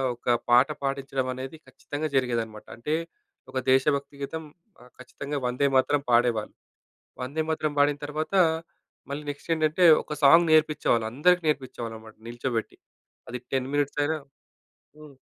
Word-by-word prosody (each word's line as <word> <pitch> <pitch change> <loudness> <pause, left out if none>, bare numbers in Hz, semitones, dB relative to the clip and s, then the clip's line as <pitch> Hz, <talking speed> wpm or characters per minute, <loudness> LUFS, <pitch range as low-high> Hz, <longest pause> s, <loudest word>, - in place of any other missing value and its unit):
ఒక 120 - -19 0.2
పాట 125 +3 +6 0.2
పాడించడమనేది 135 0 -3
ఖచ్చితంగా 150 +2 -5
జరిగేదనమాట. 115 -4 -1
అంటే, 150 +7 -1 0.6
ఒక 130 - -4
దేశభక్తి 140 +1 +2
గీతం, 160 +3 -4 0.4
ఆహ్, 125 0 -17
ఖచ్చితంగా 140 +3 -6
'వందేమాతరం' 135 +2 +2
పాడేవాళ్ళు. 120 -2 +2 0.7
'వందేమాతరం' 155 +2 -2
బాడిన 145 0 +3
తర్వాత, 155 +4 -4 0.8
మళ్ళీ 145 +1 -4
నెక్స్ట్ 145 +3 -9
ఏంటంటే, 155 +3 +3 0.2
ఒక - - -9
సాంగ్ 165 +4 +7
నేర్పించేవాళ్ళు. 150 -7 +3
అందరికి 180 +6 +3
నేర్పించేవాళ్ళనమాట 115 -6 -4
నిల్చోబెట్టి. 120 -1 -3 0.5
అది 125 - -4
10 130 0 0
మినిట్స్ 145 0 0
అయినా 160 +1 0 0.8
హ్మ్. 150 -3 -14
140 Hz, 120 wpm, -26 LUFS, 125-150 Hz, 0.8 s, సాంగ్